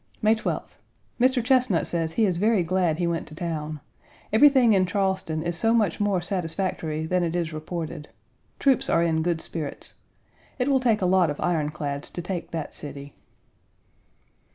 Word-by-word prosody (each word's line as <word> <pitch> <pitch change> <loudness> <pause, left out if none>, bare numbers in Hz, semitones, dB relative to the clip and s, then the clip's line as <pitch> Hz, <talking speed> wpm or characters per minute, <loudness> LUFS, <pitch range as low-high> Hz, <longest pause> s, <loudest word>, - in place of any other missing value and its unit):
May 215 +1 +4
12th. 220 - -4 0.4
Mr. 255 0 +3
Chesnut 250 -8 +3
says 165 -2 -2
he 225 - +3
is 180 -4 0
very 210 -2 +3
glad 175 -2 +1
he 175 - 0
went 170 -1 -2
to 155 - -11
town. 155 -3 -4 0.5
Everything 260 -2 +6
in 185 -2 +3
Charleston 190 -5 -1
is 170 0 -2
so 225 +7 +2
much 210 -7 +1
more 205 -3 +1
satisfactory 170 -3 -2
than 180 +2 +1
it 170 0 -1
is 170 -2 -1
reported. 155 -1 -5 0.5
Troops 270 -3 +2
are 170 - +3
in 160 -1 +1
good 170 -1 0
spirits. 155 -4 -5 0.6
It 255 +2 0
will 270 -1 +4
take 225 -6 +2
a - - +3
lot 180 -2 +4
of 145 - -4
iron 160 -4 0
clads 145 -2 -4
to 175 - -5
take 180 -1 -4
that 160 -3 -5
city. 140 -1 -8
175 Hz, 175 wpm, -25 LUFS, 160-205 Hz, 0.6 s, Everything